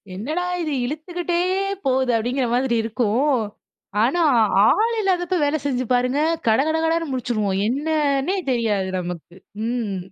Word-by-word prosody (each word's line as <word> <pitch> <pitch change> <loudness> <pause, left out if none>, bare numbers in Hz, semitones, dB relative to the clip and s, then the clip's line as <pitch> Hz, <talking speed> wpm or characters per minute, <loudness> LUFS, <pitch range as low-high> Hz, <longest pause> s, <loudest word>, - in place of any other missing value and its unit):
"என்னடா 305 - -3 0.2
இது! 310 -3 -2
இழுத்துக்கிட்டே 345 +5 -3 0.5
போகுது" 260 -1 +2
அப்பிடீங்கிற 245 +3 0
மாதிரி 250 -1 +1
இருக்கும். 240 +5 +1 0.7
ஆனா, 275 +9 +2 0.4
ஆ - - +6 0.2
ஆள் 460 +2 +2
இல்லாதப்ப 365 -2 0
வேலை 290 +2 +1
செஞ்சு 255 -3 0
பாருங்க. 250 +3 +1 0.3
கடகடகடன்னு 320 +6 +1
முடிச்சுருவோம். 220 -6 -1
என்னன்னே 290 - 0 0.2
தெரியாது, 215 -6 0
நமக்கு. 175 -1 -7 0.3
ம். 230 -5 -2
265 Hz, 120 wpm, -22 LUFS, 230-315 Hz, 0.7 s, ஆ